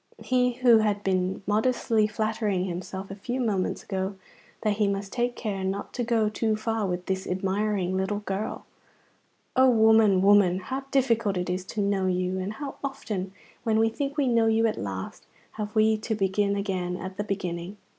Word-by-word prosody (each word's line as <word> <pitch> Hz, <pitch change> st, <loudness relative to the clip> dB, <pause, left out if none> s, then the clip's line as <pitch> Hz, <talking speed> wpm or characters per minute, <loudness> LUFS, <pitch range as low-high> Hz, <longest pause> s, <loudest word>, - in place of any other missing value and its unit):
He 250 Hz, -1 st, +2 dB
who 240 Hz, -2 st, +5 dB
had 205 Hz, -1 st, 0 dB
been 185 Hz, 0 st, 0 dB
modestly 220 Hz, 0 st, +2 dB
flattering 215 Hz, -3 st, -1 dB
himself 190 Hz, +2 st, -5 dB
a -, -, -5 dB
few 245 Hz, +6 st, -4 dB
moments 205 Hz, -7 st, -1 dB
ago 190 Hz, 0 st, -3 dB, 0.5 s
that 210 Hz, -1 st, 0 dB
he 210 Hz, -2 st, +2 dB
must 200 Hz, 0 st, -3 dB
take 240 Hz, 0 st, 0 dB
care 200 Hz, -4 st, -3 dB
not 195 Hz, +1 st, -3 dB
to 245 Hz, -, -2 dB
go 230 Hz, -2 st, +2 dB
too 215 Hz, +1 st, 0 dB
far 220 Hz, -1 st, -1 dB
with 180 Hz, 0 st, -3 dB
this 190 Hz, 0 st, -2 dB
admiring 190 Hz, 0 st, 0 dB
little 190 Hz, +2 st, -1 dB
girl! 205 Hz, +1 st, -4 dB, 0.9 s
O 260 Hz, 0 st, +6 dB
woman, 220 Hz, -4 st, +5 dB
woman, 200 Hz, -3 st, +5 dB
how 260 Hz, +9 st, -5 dB
difficult 230 Hz, -7 st, +2 dB
it 180 Hz, 0 st, -1 dB
is 180 Hz, 0 st, -2 dB
to 210 Hz, -, -3 dB
know 200 Hz, -1 st, +1 dB
you, 185 Hz, 0 st, 0 dB
and 190 Hz, +3 st, -3 dB
how 275 Hz, +3 st, -6 dB
often, 210 Hz, -9 st, -4 dB, 0.3 s
when 225 Hz, -2 st, +1 dB
we 225 Hz, 0 st, +4 dB
think 280 Hz, +5 st, -4 dB
we 280 Hz, -3 st, +2 dB
know 230 Hz, -2 st, +3 dB
you 225 Hz, +1 st, +3 dB
at 220 Hz, -, +1 dB
last, 95 Hz, -1 st, -6 dB, 0.2 s
have 210 Hz, 0 st, -6 dB
we 220 Hz, 0 st, +4 dB
to 220 Hz, +1 st, -2 dB
begin 200 Hz, 0 st, +1 dB
again 185 Hz, -3 st, -2 dB
at 185 Hz, +1 st, -7 dB
the 205 Hz, -, -1 dB
beginning! 185 Hz, -1 st, -4 dB
205 Hz, 185 wpm, -26 LUFS, 190-225 Hz, 0.9 s, O